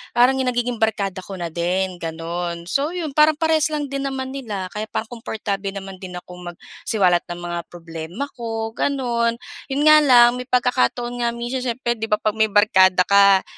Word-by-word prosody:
parang 245 +2 +5
nagiging 245 -2 -1
barkada 200 -3 0
ko 195 +1 -8
na 175 - -3
din 180 +2 -1
gano'n. 170 +1 -4
So, 280 - 0
'yon 325 -4 -3
parang 305 +1 +5
parehas 320 -2 +2
lang 300 -1 -2
din 275 0 -3
naman 265 -1 -4
nila 210 -9 -5
kaya 215 +1 -4
parang 220 +1 -4
comportable 200 -3 -3
naman 195 -1 -8
din 180 -1 -8
akong 180 0 -11
magsiwalat 180 0 0
ng 175 - -6
mga 175 0 -3
problema 165 - -7
ko, 225 -1 -4
gano'n. 235 -4 0 0.3
'Yon 275 +2 -1
nga 305 0 +8
lang, 245 -4 +7
may 250 - -7
pagkakataon 245 - 0
nga 235 - +2
minsan 240 +2 -3
siyempre, 240 -1 -1
'di 225 - -2
ba, 210 - +3
'pag 215 0 -1
may 220 0 +3
barkada 190 -3 +4
ka 200 -1 +5
220 Hz, 180 wpm, -21 LUFS, 185-250 Hz, 0.3 s, nga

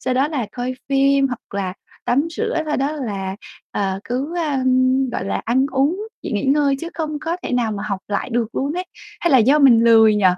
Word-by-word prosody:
sau 255 -1 -1
đó 270 +3 +2
là 265 -9 -2
coi 250 +1 -3
phim 275 0 +3
hoặc 245 -5 -8
là 190 -2 -2 0.3
tắm 280 +7 +1
rửa, 445 -8 -1
sau 300 - 0
đó 275 +3 0
là, 200 -9 -4 0.3
ờ, 195 -1 -2
cứ, 275 +8 -3
ơ, 305 -5 0 0.6
gọi 190 - -3
là, - - -2
ăn 260 +4 +2
uống, 280 +6 +2 0.3
chỉ - - -5
nghỉ 205 +2 -1
ngơi 280 0 +3
chứ 335 - -5
không 305 -2 -3
có 325 +3 -3
thể - - -4
nào 235 -3 +1
mà 200 -1 -4
học 200 -2 -3
lại 205 +4 -2
được 230 -1 -1
luôn 280 +2 -1
ấy. 360 +2 -3 0.4
Hay 345 - +1
là 265 - +6
do 265 +7 +4
mình 255 -6 +6
lười 225 -2 +6
nhỉ? 210 -2 0
265 Hz, 225 wpm, -20 LUFS, 225-295 Hz, 0.6 s, là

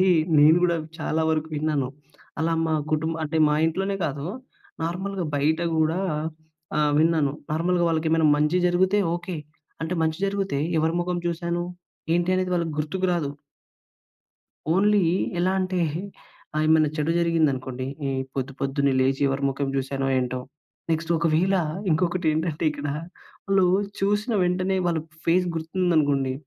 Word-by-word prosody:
అయి 185 0 +4 0.3
నేను 155 +3 +7
కూడా 170 -1 +2 0.2
చాలా 160 0 -1
వరకు 160 0 0
విన్నాను. 145 -3 0 0.5
అలా 165 +1 +1
మా 160 - +1 0.2
కుటుంబ 160 +1 0
అంటే 160 +2 -3
మా 150 - +2
ఇంట్లోనే 195 +4 -1
కాదు 140 0 -4 0.6
నార్మల్‍గా 185 +2 -3
బయట 155 +4 +1 0.2
కూడా 160 +3 +2 0.8
ఆహ్, 150 -1 +2
విన్నాను 160 -4 +2 0.2
నార్మల్‌గా 175 +2 +1
వాళ్ళకి 160 -1 0
ఏమైనా 160 -2 +4
మంచి 150 +4 +2
జరిగితే 185 +3 +2
ఓకె. 175 0 -4 0.5
అంటే 165 +2 -2
మంచి 160 +1 -1
జరిగితే, 195 -6 -1 0.2
ఎవరి 160 +1 +1
మొఖం 175 0 -1
చూశాను 170 0 -2 0.5
ఏంటి 175 +1 +1
అనేది 185 0 -1
వాళ్ళకి 170 -2 -1
గుర్తుకు 185 +5 -1
రాదు. 155 -5 -1 1.4
ఓన్లీ 205 +1 +4 0.4
ఎలా 180 +2 +2
అంటే 185 -1 -1 0.8
ఆహ్, 155 - +1
ఏమైనా 155 -1 +4
చెడు 150 +2 +1
జరిగిందనుకోండి. 135 -7 0 0.2
ఈ - - 0 0.3
పొద్దు 135 0 -2
పొద్దున్నే 140 0 +1
లేచి 135 +1 +1
ఎవరి 135 +1 -2
మొఖం 140 +1 -2
చూశానో 135 0 -1
ఏంటో. 125 0 -1 0.5
నెక్స్ట్ 165 +1 -1
ఒకవేళ 170 +4 +2 0.4
ఇంకొకటి 175 +2 0
ఏంటంటే 160 0 -2
ఇక్కడ 145 -1 -7 0.6
వాళ్ళు 195 -1 +4 0.3
చూసిన 205 +4 +1
వెంటనే 185 +2 0
వాళ్ళ 165 -2 +1 0.3
ఫేస్ 180 +2 +3
గుర్తుందనుకోండి, 160 -5 +1
160 Hz, 140 wpm, -25 LUFS, 150-180 Hz, 1.4 s, నేను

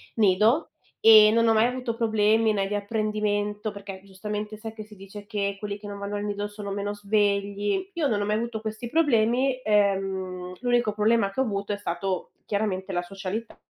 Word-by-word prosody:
nido, 215 - +3 0.3
e 215 -1 +8
non 230 +1 +3
ho 225 - +5
mai 220 +1 +4
avuto 250 -2 -3
problemi 220 -1 +3
né 200 -2 0
di 205 - -2
apprendimento 210 0 -1
perché 200 -2 -9
giustamente 210 +2 -5
sai 220 +1 -7
che 220 -1 -8
si 210 0 -15
dice 195 +2 -10
che 200 -2 -2
quelli 205 0 -5
che 205 - -9
non 200 0 -6
vanno 200 +1 -4
al 205 - -3
nido 205 0 -2
sono 205 -1 -7
meno 205 +1 -2
svegli; 205 - 0
io 330 -5 0
non 215 -6 0
ho 205 - -1
mai 210 +1 +1
avuto 230 0 -2
questi 220 +2 -5
problemi, 255 -3 +2
ehm, 190 -3 0
l'unico 245 -2 +1
problema 210 -1 +2
che 195 - -6
ho - - +4
avuto, 200 -2 -3
è 205 - -1
stato 190 -1 -3
chiaramente 200 -2 -2
la 175 -1 0
socialità 195 +5 -6
210 Hz, 195 wpm, -26 LUFS, 200-220 Hz, 0.3 s, e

